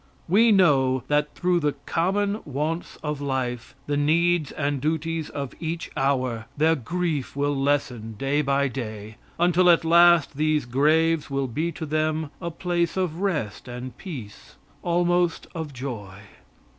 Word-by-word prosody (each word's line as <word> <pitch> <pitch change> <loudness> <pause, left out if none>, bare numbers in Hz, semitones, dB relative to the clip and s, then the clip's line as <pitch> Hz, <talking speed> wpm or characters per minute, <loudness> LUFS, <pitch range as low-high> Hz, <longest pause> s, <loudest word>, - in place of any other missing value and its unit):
We 220 +6 +5
know 135 - +4
that 150 0 +1
through 180 -1 +1
the 150 -3 0
common 200 +5 0
wants 155 +4 -3
of 150 -2 -3
life, 130 -3 -3
the 145 - -1
needs 165 +1 +2
and 145 -2 -2
duties 160 +1 -1
of 140 -3 -5
each 165 0 -4
hour, 130 -5 0
their 160 +2 +4
grief 155 +1 -2
will 145 0 0
lessen 135 -5 -1
day 140 +5 +1
by 140 0 +1
day 110 -4 -6 0.2
until 175 +1 +4
at 170 -1 +5
last 170 -3 +5
these 155 -2 +1
graves 155 +5 +2
will 140 0 -1
be 155 +8 -2
to 160 - -5
them 155 0 -1
a 170 - -3
place 170 +1 -1
of 180 -2 -1
rest 155 - -2
and 125 +1 -7
peace 125 - -9 0.3
almost 175 0 +1
of 160 -4 -5
joy. 115 -8 -7
150 Hz, 145 wpm, -25 LUFS, 135-170 Hz, 0.3 s, We